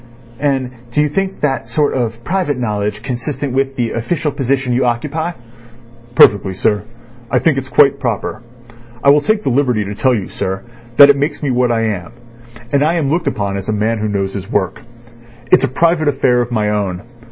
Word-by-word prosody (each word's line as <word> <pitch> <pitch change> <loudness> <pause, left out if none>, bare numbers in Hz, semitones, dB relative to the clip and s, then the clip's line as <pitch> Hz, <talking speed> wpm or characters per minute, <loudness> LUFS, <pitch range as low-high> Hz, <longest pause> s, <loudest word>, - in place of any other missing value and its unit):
"And 135 -3 0 0.2
do 120 - -1
you 150 - +1
think 195 +5 -2
that 135 -5 -1
sort 145 +4 +1
of 115 -2 -2
private 175 -4 -1
knowledge 105 -2 -2
consistent 135 +1 -4
with 135 0 0
the 120 -3 -1
official 150 +6 -2
position 135 -1 -1
you 125 +2 +1
occupy?" 150 +8 -1 0.8
"Perfectly, 100 -4 +5
sir. 105 +2 0 0.4
I - - +2
think 160 -4 +2
it's 130 0 -9
quite 140 -1 +4
proper. 115 -4 -3 0.6
I 140 - +7
will 145 +1 +4
take 215 +5 0
the - - 0
liberty 125 -5 +1
to 100 - -5
tell 125 +4 +2
you, 100 -5 -3
sir, 95 +1 -4 0.3
that 140 0 +10
it - - 0
makes 145 +2 -2
me 140 - 0
what 125 -1 +2
I 115 -1 +1
am—and 115 +5 -4
I 160 +3 +2
am 145 -5 0
looked 165 +1 0
upon 100 -1 -1
as 100 +2 -6
a - - +1
man 110 +2 0
who 105 - -1
knows 100 -2 -2
his 100 0 -6
work. 95 +1 -1 0.7
It's - - +6
a - - -3
private 165 +3 +1
affair 125 -3 +2
of 120 - -3
my 105 -3 0
own. 100 -3 -2
125 Hz, 200 wpm, -16 LUFS, 110-145 Hz, 0.8 s, that